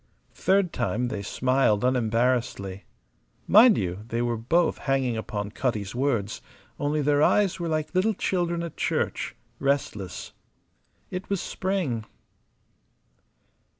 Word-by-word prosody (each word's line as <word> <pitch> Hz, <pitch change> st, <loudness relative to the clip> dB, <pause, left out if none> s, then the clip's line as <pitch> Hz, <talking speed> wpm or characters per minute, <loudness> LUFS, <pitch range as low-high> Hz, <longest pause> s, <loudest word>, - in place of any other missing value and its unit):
Third 190 Hz, -2 st, +2 dB
time, 120 Hz, +1 st, -1 dB
they 100 Hz, -, -4 dB
smiled 125 Hz, 0 st, +1 dB
unembarrassedly. 115 Hz, -5 st, 0 dB, 0.6 s
Mind 220 Hz, +2 st, +7 dB
you, 90 Hz, -1 st, -2 dB
they 115 Hz, +1 st, -1 dB
were 120 Hz, -1 st, 0 dB
both 160 Hz, +10 st, +1 dB
hanging 135 Hz, -4 st, 0 dB
upon 105 Hz, -2 st, -4 dB
Cutty's 110 Hz, -5 st, -2 dB
words; 120 Hz, -6 st, -1 dB, 0.4 s
only 145 Hz, +1 st, 0 dB
their 145 Hz, 0 st, +3 dB
eyes 195 Hz, +3 st, +3 dB
were 170 Hz, -, -2 dB
like 155 Hz, 0 st, -2 dB
little 200 Hz, +4 st, +2 dB
children 175 Hz, -3 st, -1 dB
at 170 Hz, -, -6 dB
church, -, -, -1 dB, 0.2 s
restless. 110 Hz, -10 st, -2 dB, 0.8 s
It 185 Hz, +1 st, -5 dB
was 200 Hz, -2 st, 0 dB
spring. 175 Hz, -, -2 dB
130 Hz, 115 wpm, -26 LUFS, 110-170 Hz, 0.8 s, Mind